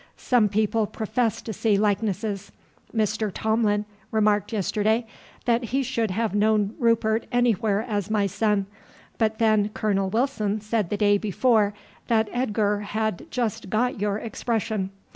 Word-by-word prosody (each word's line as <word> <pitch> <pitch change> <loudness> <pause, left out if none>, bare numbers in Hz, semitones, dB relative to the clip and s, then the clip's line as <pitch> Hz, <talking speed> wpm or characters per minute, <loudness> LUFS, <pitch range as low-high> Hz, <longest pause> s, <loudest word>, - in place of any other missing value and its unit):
Some 235 -5 +2
people 215 +1 +1
profess 225 +1 -1
to 220 - -5
see 210 -1 +2
likenesses. 205 -1 -1 0.4
Mr. 215 -1 0
Tomline 215 0 +1 0.2
remarked 210 -1 +2
yesterday 220 +2 +1 0.4
that 235 0 +2
he 265 +4 0
should 230 -4 -1
have 220 +2 -1
known 210 0 +2
Rupert 230 -2 +2
anywhere 225 -4 +2
as 205 -3 -2
my 210 -2 +2
son, 205 +1 +1 0.5
but 220 -1 +1
then 215 -2 +3
Colonel 195 -2 0
Wilson 220 -2 0
said 215 -3 -1
the 205 - -1
day 205 -1 +3
before 215 0 +2 0.3
that 220 -2 +2
Edgar 210 -4 0
had 215 -1 -2
got - - -14
just 235 -6 -2 0.3
your 205 0 0
expression. 220 -3 -2
215 Hz, 140 wpm, -25 LUFS, 205-225 Hz, 0.5 s, then